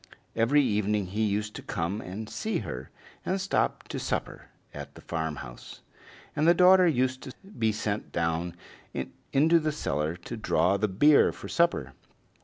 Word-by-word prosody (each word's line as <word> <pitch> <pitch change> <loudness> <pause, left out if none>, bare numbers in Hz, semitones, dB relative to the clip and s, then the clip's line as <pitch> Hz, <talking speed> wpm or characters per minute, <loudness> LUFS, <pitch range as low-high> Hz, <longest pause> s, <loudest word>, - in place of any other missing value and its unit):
Every 130 +6 +4
evening 105 -3 +1
he 100 +4 -3
used 105 0 0
to - - -7
come 95 +3 -3
and 105 +4 -6
see 220 - -2
her, - - -6 0.3
and 190 +1 -1
stop 195 +1 0
to - - -4
supper - - -3 0.3
at - - -8
the - - -12
farmhouse, 75 -7 -6 0.5
and 155 +2 +2
the 170 - +7
daughter 185 +1 +7
used 130 -4 +1
to 130 - -8
be 115 - -1
sent 105 0 -3
down 85 +1 -1 0.8
into 160 +5 +5
the 155 -1 -1
cellar 80 - -2
to 90 +7 -8
draw 100 -2 +2
the 110 +2 +1
beer 145 +10 +5
for - - -9
supper. 170 - +1
110 Hz, 160 wpm, -28 LUFS, 90-150 Hz, 0.8 s, the